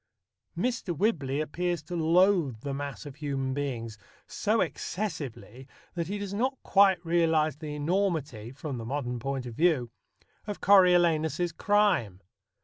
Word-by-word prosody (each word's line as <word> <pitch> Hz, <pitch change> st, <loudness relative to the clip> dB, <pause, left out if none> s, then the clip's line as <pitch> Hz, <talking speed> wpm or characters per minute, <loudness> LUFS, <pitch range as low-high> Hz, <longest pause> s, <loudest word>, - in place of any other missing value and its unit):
Mr. 225 Hz, -, -2 dB
Whibley 145 Hz, -9 st, 0 dB
appears 175 Hz, +1 st, -2 dB
to 175 Hz, +4 st, -6 dB
loathe 165 Hz, -, +3 dB
the 140 Hz, 0 st, -4 dB
mass 140 Hz, +1 st, -5 dB
of 140 Hz, -1 st, -9 dB
human 135 Hz, -3 st, -2 dB
beings 120 Hz, -6 st, -4 dB, 0.3 s
so 215 Hz, +2 st, 0 dB
excessively 140 Hz, -, -4 dB, 0.3 s
that 170 Hz, -2 st, -3 dB
he 205 Hz, +3 st, -3 dB
does 200 Hz, -1 st, -5 dB
not 260 Hz, +6 st, 0 dB
quite 195 Hz, -2 st, +5 dB
realize 160 Hz, -3 st, +2 dB
the 150 Hz, -1 st, -6 dB
enormity 150 Hz, -, -1 dB
(from 135 Hz, -1 st, -6 dB
the 115 Hz, -, -6 dB
modern 125 Hz, -1 st, -3 dB
point 135 Hz, +1 st, -3 dB
of 120 Hz, -, -7 dB
view) 145 Hz, -5 st, +1 dB, 0.6 s
of 205 Hz, -, -4 dB
Coriolanus's 175 Hz, -3 st, +4 dB
crime. 185 Hz, -, +1 dB
155 Hz, 140 wpm, -28 LUFS, 135-185 Hz, 0.6 s, quite